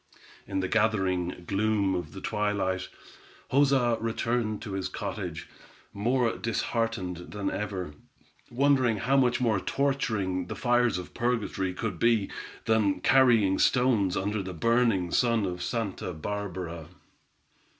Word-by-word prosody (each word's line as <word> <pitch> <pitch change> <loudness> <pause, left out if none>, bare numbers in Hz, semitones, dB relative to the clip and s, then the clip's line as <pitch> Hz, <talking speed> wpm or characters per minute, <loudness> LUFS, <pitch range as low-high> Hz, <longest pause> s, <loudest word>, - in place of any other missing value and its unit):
In 95 - -1
the 95 - -1
gathering 95 -5 0
gloom 100 0 +1
of 90 -1 -4
the 95 - -8
twilight, 105 -3 -1 0.6
Joza 135 -4 +3
returned 115 -1 -1
to 105 - -6
his 95 -1 -2
cottage, - - -5 0.5
more 120 +3 +1
disheartened 115 -5 -2 0.2
than 100 -1 -2
ever, 95 -6 -4 0.6
wondering 130 -3 +3
how 125 +8 +1
much 125 -3 +3
more 115 -5 +2
torturing 105 -9 -1
the 110 - -5
fires 120 +1 +2
of 90 - -8
purgatory 110 -6 -1
could 100 -5 -4
be, 115 -4 +2 0.3
than 105 -5 +2
carrying 115 -8 +4
stones 120 -7 +3
under 105 +2 -1
the 95 -1 -6
burning 115 -3 +2
sun 115 -2 +2
of 90 -1 -4
Santa 100 -3 -3
Barbara. 90 -2 -5
105 Hz, 125 wpm, -28 LUFS, 95-120 Hz, 0.6 s, carrying